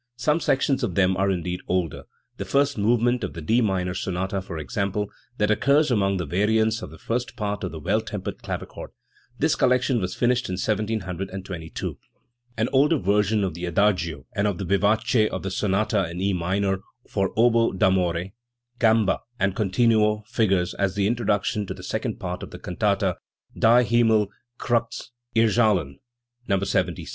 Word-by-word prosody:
Some 150 +6 +1
sections 135 -2 +1
of 105 -9 -2
them 95 0 +3
are 95 +1 +1
indeed 90 -1 -2
older, 90 -5 -1 0.3
the - - -3
first 140 +1 +1
movement 120 +3 +2
of 90 - -3
the 85 - -7
D 115 +10 +2
minor 95 -4 0
sonata, 95 +1 -2
for 90 -3 -7
example, 100 +7 -2 0.3
that 105 0 +2
occurs 140 +6 +3
among 100 -4 +2
the 85 - -2
variants 110 +7 +1
of - - -7
the 80 - -12
first 120 +5 -3
part 105 -3 -3
of 90 - -3
the 80 - -7
Well 75 - +1
tempered - - -6
Clavichord. - - -6 0.5
This 155 +3 +2
collection 125 -2 +2
was 90 0 -3
finished 125 -1 +1
in - - -2
1722. 95 -4 -3 0.6
An 110 +1 +1
older 145 +4 +4
version 105 -1 +1
of 95 - -1
the 85 +2 -5
adagio 85 -4 +1
and 105 0 +1
of 100 -4 -1
the 95 - -4
vivace 110 +4 +2
of 95 - -5
the 95 - -3
sonata 95 -2 0
in 85 +1 -6
E 100 +1 +1
minor, 95 +2 0 0.3
for 95 -1 -1
oboe 115 0 +4
d'amore, 95 -2 +1 0.5
gamba, 110 -3 +3 0.2
and 100 -1 +1
continuo, 105 +1 +2
figures 100 -6 +1
as 100 -2 -1
the 100 -1 +1
introduction 105 -2 0
to - - -5
the - - -11
second - - -3
part 90 0 -4
of - - -7
the - - -9
can 90 - -7
tata 100 -3 +1 0.4
Die 120 +2 +5
Himmel 110 -3 +3 0.3
erzdhkn 115 - 0 0.5
(No. 100 - +2
100 Hz, 165 wpm, -24 LUFS, 95-115 Hz, 0.6 s, Die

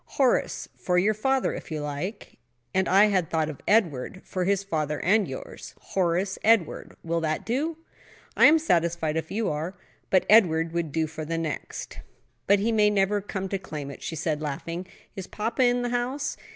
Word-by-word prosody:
"Horace, 265 -3 +1
for 180 -1 0
your 200 +4 +3
father, 265 +5 0
if - - -8
you 155 -2 -3
like." 150 - -5 0.3
"And 190 0 +1
I 195 +3 +6
had 185 -5 +1
thought 155 -1 0
of 145 - -13
Edward, 185 - +1
for 185 -1 -2
his 200 +1 +1
father 155 -6 -2
and 205 +4 +3
yours. - - -8
Horace 185 +1 -1
Edward. 215 -7 +2
Will 165 0 -1
that 155 -1 -2
do?" 300 +7 -1 0.6
"I - - +8
am 310 +2 +6
satisfied, 170 - +1
if 160 0 -2
you 220 +2 -1
are. 160 +5 -4 0.3
But 185 - +3
Edward 165 -7 +5
would 170 -3 -2
do 160 +2 0
for 155 0 -7
the 165 +2 -3
next." 160 -2 -5 0.5
"But 200 - +6
he 215 +4 0
may 210 -2 +4
never 205 0 +1
come 195 -1 -4
to 195 - -2
claim 150 -6 -6
it," 140 - -11
she 165 - -4
said, 155 -1 -2
laughing. 165 +5 -4 0.3
"Is 190 -2 -6
papa 225 +4 -2
in 245 0 +2
the 245 - -1
house?" 250 +4 -2
185 Hz, 190 wpm, -26 LUFS, 160-215 Hz, 0.6 s, I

